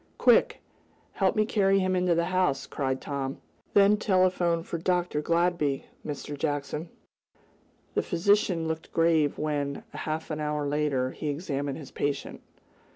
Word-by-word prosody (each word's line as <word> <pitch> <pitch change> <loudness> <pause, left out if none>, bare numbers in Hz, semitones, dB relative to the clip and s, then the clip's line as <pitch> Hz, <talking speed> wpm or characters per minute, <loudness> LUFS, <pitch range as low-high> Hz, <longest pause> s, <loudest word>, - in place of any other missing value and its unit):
"Quick! - - +4 0.5
Help 190 -2 +1
me 215 - +3
carry 195 -3 +3
him 185 -1 +1
into 180 -1 +2
the 170 0 +1
house!" 180 -8 +1
cried 130 -2 -2
Tom. 135 -1 -4 0.4
"Then 205 +1 +6
telephone 185 -4 +2
for 170 - -4
Dr. 175 -3 0
Gladby, 170 -4 +1 0.2
Mr. 145 0 -5
Jackson." 145 +2 -3 1.0
The - - +2
physician 180 -2 +2
looked 160 0 -4
grave 165 -3 +2
when, 145 -2 -2
half 155 +1 -4
an 155 - -3
hour 150 -1 -1
later, 140 -3 0
he 150 - -4
examined 145 -2 -3
his 145 -4 -10
patient. 145 -1 -3
160 Hz, 140 wpm, -28 LUFS, 145-180 Hz, 1.0 s, Then